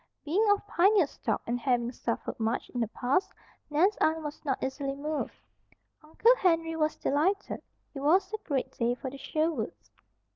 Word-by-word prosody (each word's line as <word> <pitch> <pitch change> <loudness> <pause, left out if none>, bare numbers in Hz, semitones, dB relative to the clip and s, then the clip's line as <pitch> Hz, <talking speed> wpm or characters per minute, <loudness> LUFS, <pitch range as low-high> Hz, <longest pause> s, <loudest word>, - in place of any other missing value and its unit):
Being 400 +8 +2
of 410 0 +3
pioneer 395 -1 +4
stock, 225 -5 -3
and 240 +1 -1
having 245 -2 +1
suffered 235 -2 -4
much 225 +2 -1
in 245 - -3
the 225 - +1
past, 265 - 0 0.4
Nan's 350 +8 +3
aunt 315 0 +1
was 295 0 -6
not 270 -4 0
easily 275 +1 -2
moved. 300 +2 -3 0.7
Uncle 440 +11 +4
Henry 330 -4 +2
was 310 -1 +1
delighted. 370 +8 0 0.3
It 280 - -6
was 345 +9 +3
a 435 - -2
great 280 -10 -2
day 240 +1 0
for 260 +1 -6
the 275 - -9
Sherwoods. 310 -6 -2
300 Hz, 170 wpm, -29 LUFS, 260-345 Hz, 0.7 s, pioneer